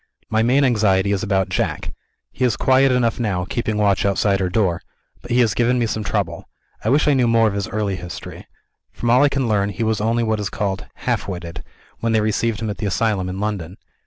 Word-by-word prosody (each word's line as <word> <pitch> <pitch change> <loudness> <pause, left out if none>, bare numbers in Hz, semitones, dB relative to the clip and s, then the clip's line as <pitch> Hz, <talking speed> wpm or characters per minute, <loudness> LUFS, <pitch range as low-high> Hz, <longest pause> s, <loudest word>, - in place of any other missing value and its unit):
My 110 0 +2
main 130 +5 +3
anxiety 105 -6 +2
is 100 -2 0
about 95 -3 0
Jack. 75 -5 -2 0.4
He - - -4
is 120 -5 +2
quiet 130 +1 +4
enough 125 -2 +1
now, 95 -6 -1
keeping 110 +1 -2
watch 100 -2 +2
outside 100 0 +1
her 95 -1 0
door; 90 -4 0 0.4
but 120 - -12
he 125 +1 +3
has 110 -4 +2
given 120 +4 +2
me 120 - +1
some 110 -1 -2
trouble. 95 -6 -3 0.3
I 110 - 0
wish 145 +4 +3
I 145 - +5
knew 130 -3 +2
more 115 -1 +4
of 105 - -1
his 100 -1 -2
early 100 -2 -2
history. 90 -1 -9 0.4
From 120 - -1
all 125 +3 +5
I 145 - +5
can 135 -2 -1
learn, 100 -2 +1
he 100 +3 -3
was 110 -1 0
only 115 +2 +1
what 110 -1 0
is 100 -3 -2
called 95 -2 -3
"half - - -2
witted," 85 -3 -6 0.4
when 115 0 0
they 110 - +4
received 110 +1 0
him 110 - -2
at 100 - -8
the 105 - -1
asylum 100 -2 0
in 95 +1 -5
London. 100 -4 -3
105 Hz, 230 wpm, -20 LUFS, 95-115 Hz, 0.4 s, I